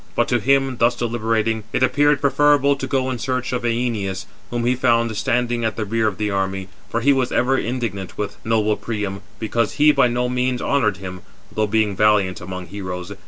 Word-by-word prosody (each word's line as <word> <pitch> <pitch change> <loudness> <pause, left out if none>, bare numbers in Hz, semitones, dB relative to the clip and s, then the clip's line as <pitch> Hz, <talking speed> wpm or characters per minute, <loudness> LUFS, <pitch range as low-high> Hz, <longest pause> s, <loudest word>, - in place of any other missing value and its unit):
But - - +2
to - - +2
him, 135 -2 +2
thus 120 +1 +3
deliberating, 115 -2 -1
it - - +1
appeared 145 +2 +3
preferable 140 0 +4
to 135 - -5
go 130 -1 0
in 125 - -4
search 130 0 -2
of 125 - -1
Æneas; 115 -6 -1 0.2
whom 120 -1 -2
he 125 - +3
found 115 -3 +2
standing 120 +2 0
at 110 -1 -1
the 110 - -2
rear 110 +1 0
of 100 - -2
the 105 -1 -1
army, 95 -1 -2 0.2
for 115 - -1
he 140 +4 +4
was 130 -2 0
ever 130 +2 +2
indignant 115 -8 -3
with 105 -1 -5
noble 110 -1 +1
Priam, 105 -3 -4 0.2
because 115 +1 -1
he 150 +1 +5
by 135 - +4
no 120 +1 0
means 125 0 0
honoured 110 -9 +1
him, 95 -1 -7 0.3
though 110 0 0
being 105 -1 +1
valiant 100 -2 +2
among 95 0 -6
heroes. 90 0 -6
115 Hz, 200 wpm, -21 LUFS, 105-125 Hz, 0.3 s, he